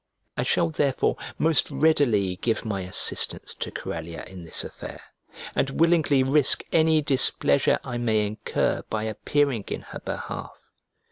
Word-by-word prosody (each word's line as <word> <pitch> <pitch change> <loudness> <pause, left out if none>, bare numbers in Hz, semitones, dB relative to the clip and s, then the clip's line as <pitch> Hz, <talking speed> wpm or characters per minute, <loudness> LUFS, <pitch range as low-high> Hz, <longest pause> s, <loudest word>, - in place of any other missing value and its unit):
I - - -1
shall 85 - +1
therefore 135 - +1 0.2
most 160 -2 +2
readily 115 -12 +2
give 115 +3 -1
my 100 -3 -2
assistance 90 0 -1
to - - -5
Corellia 80 0 -6
in 90 -2 -11
this 80 - 0
affair, - - -9 0.5
and 135 0 -1
willingly 160 -5 +4
risk 135 +1 +3
any 160 -1 +3
displeasure 130 - +3
I 125 -1 -4
may 110 -3 +1
incur 105 +1 -1
by 110 -1 -2
appearing 115 +2 0
in - - -4
her - - -6
behalf. - - -6
120 Hz, 140 wpm, -25 LUFS, 100-145 Hz, 0.5 s, willingly